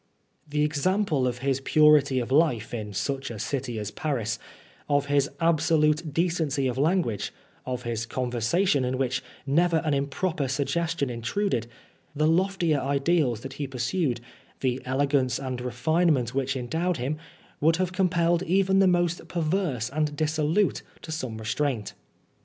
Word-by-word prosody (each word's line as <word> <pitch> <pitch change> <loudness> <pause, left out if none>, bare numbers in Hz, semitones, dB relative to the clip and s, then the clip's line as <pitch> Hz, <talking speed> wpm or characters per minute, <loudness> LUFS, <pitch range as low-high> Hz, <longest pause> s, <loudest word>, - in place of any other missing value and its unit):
The 150 0 +1
example 155 -1 +1
of 125 -1 -2
his 135 -1 +1
purity 150 -2 +5
of 125 0 -2
life 135 -7 +2
in 105 -3 -4
such 135 +7 -2
a 115 - -6
city 125 +1 -3
as 105 -1 -4
Paris, 120 -9 -2 0.5
of 145 -1 +2
his 145 -1 +2
absolute 160 -1 +2
decency 160 -4 0
of 130 0 -1
language, 155 - +1 0.4
of 125 -1 -3
his 115 -1 -3
conversation, 130 - +1
in 130 +1 -1
which 125 -1 0 0.2
never 165 +4 +3
an 150 - +1
improper 140 +2 -1
suggestion 145 +1 -1
intruded, 120 - -1 0.5
the 155 +1 +2
loftier 170 -2 +2
ideals 140 -3 +1
that 135 +1 -7
he 140 - -1
pursued, 130 0 -1 0.4
the 130 0 0
elegance 130 -1 +1
and 130 -2 -4
refinement 125 +1 +1
which 135 0 -1
endowed 160 +8 -1
him, 135 +5 -2 0.4
would 160 +2 +4
have 185 +1 -1
compelled 175 -2 +2
even 190 +2 +2
the 195 - +5
most 175 -1 +1
perverse 160 - -1
and 150 0 -1
dissolute 155 +5 +1 0.2
to 160 - -7
some 130 -8 -4
restraint. 115 +1 -2
145 Hz, 145 wpm, -26 LUFS, 125-165 Hz, 0.5 s, purity